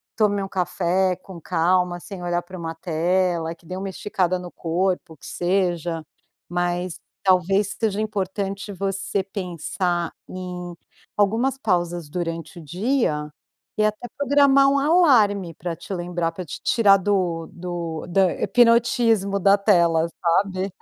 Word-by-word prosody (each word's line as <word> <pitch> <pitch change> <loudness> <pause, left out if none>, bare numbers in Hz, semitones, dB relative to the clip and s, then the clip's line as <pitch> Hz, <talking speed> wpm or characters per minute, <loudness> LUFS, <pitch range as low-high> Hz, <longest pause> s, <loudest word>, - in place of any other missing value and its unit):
tome 205 -2 +2
um - - -4
café 185 0 0
com 185 -1 -11
calma 175 +2 +1
sem 190 0 -9
olhar 175 0 0
para 185 +1 -10
uma 165 -1 -5
tela, 170 0 0
que 170 - -26
dê 180 - -6
uma 195 +1 -4
esticada 185 -1 -1
no 180 -1 -8
corpo, 175 -1 -1
que - - -15
seja. 175 -3 -1 0.5
Mas 175 0 -2 0.2
talvez 195 +2 +2
seja 215 -2 0
importante 200 -1 -3
você 195 +1 -2
pensar 180 -2 -2 0.2
em 180 -1 -6 0.4
algumas 225 +7 +2
pausas 175 - -1
durante 165 0 -4
o - - -11
dia 175 - 0 0.5
e 215 - +3
até 215 +3 -2
programar 280 -1 +5
um 280 - +2
alarme 245 - +4
pra 170 +1 -5
te 195 - -8
lembrar, 175 -1 -2
pra 180 +2 -7
te 145 - -8
tirar 205 -4 +5
do 180 -4 0
do 170 -3 -5
do 175 +2 +1
hipnotismo 230 -4 +3
da 195 +1 +5
tela, 170 -5 +3
sabe? 185 +2 +1
185 Hz, 140 wpm, -23 LUFS, 175-200 Hz, 0.5 s, programar